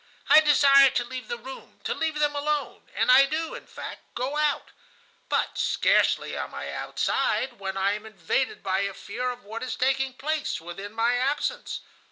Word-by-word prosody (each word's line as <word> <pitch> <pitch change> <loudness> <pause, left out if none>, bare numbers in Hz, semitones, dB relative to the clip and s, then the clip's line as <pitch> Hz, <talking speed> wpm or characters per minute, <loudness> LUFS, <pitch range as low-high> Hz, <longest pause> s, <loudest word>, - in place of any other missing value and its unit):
I - - +9
desire 275 -2 +6
to 240 - 0
leave 255 +1 -7
the 240 - -4
room, 260 +3 -11
to - - -1
leave 320 -1 -2
them 295 -1 +1
alone, 295 0 -2
and - - +3
I 270 +2 +7
do, 315 +3 -2
in - - -9
fact, - - -8
go 255 +4 -2
out; 300 -1 0 0.6
but - - 0
scarcely - - +2
am - - -5
I - - -5
outside 250 -4 -1
when 195 -1 -4
I 195 +1 +2
am 210 +1 -5
invaded 215 +5 -2
by 190 0 0
a 200 -1 -2
fear 250 +1 -4
of 245 0 -7
what 220 +3 -7
is 255 - -3
taking 265 0 0
place 310 +3 -2
within 175 +5 -8
my 230 +2 +2
absence. 290 - -1
255 Hz, 185 wpm, -26 LUFS, 220-290 Hz, 0.6 s, I